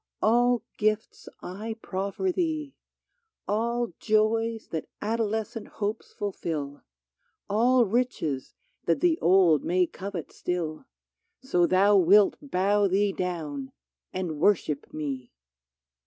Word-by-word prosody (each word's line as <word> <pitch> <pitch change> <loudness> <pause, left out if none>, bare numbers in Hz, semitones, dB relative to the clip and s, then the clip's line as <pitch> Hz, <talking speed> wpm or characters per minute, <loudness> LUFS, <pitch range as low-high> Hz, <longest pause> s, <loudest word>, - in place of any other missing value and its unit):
all 240 +1 +3 0.2
gifts 215 +1 -1
I 215 +5 -5
proffer 200 - -2
thee 315 -6 -2 0.4
— 465 -3 -53
All 235 +1 0
joys 225 +1 +1
that 160 - -4
adolescent 220 0 -2
hopes 210 +2 -3
fulfill, 155 -8 -4 0.7
All 240 +4 +4
riches 195 - -1 0.3
that 165 - +2
the 345 -2 +3
old 175 -4 +4
may 180 +1 +2
covet 185 -2 -6
still 175 - -3 0.3
— 360 - -54
So 175 -1 +4
thou 200 +3 +5
wilt 195 +3 +6
bow 205 -5 +2
thee 200 +2 +2
down 155 -8 -4 0.4
and 175 -5 -3
worship 155 -5 +1
me 135 -5 -4
205 Hz, 110 wpm, -27 LUFS, 175-230 Hz, 0.7 s, wilt